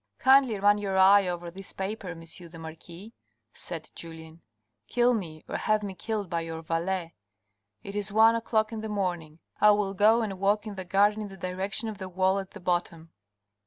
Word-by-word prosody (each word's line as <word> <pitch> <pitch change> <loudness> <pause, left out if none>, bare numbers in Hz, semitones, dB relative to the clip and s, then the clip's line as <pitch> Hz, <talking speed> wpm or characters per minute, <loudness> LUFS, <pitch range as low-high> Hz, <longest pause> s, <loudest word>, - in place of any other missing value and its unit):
" - - -54
Kindly 265 -6 +5
run 205 +1 +4
your 195 -2 -2
eye 195 +1 +6
over 175 -1 -4
this 195 +2 -7
paper, 195 0 -4
M. 165 -1 -8
the 165 0 -9
marquis," 170 +6 -10 0.4
said 160 -3 -7
Julien. 165 0 -10 0.2
" 105 0 -54
Kill 245 +1 +3
me, 165 -8 -5
or - - -3
have 215 0 +1
me 200 -2 -4
killed 205 +2 -3
by 170 -1 -2
your 165 0 -6
valet. 170 +1 -2 0.7
It 200 - -7
is 205 -1 0
one 220 +2 +6
o'clock 220 -1 0
in 220 - -4
the 220 - -5
morning. 175 -6 -3 0.2
I 210 - +7
will 205 -2 +2
go 215 +4 +4
and 195 -4 -4
walk 205 +2 +1
in 210 - -5
the 190 -1 -6
garden 205 +4 +3
in 210 - -4
the 195 -1 -11
direction 190 +5 -3
of 215 -3 -6
the 190 - -6
wall 190 +2 +1
at 195 -1 -7
the 210 - -11
bottom." 175 -2 -2
195 Hz, 205 wpm, -28 LUFS, 170-210 Hz, 0.7 s, I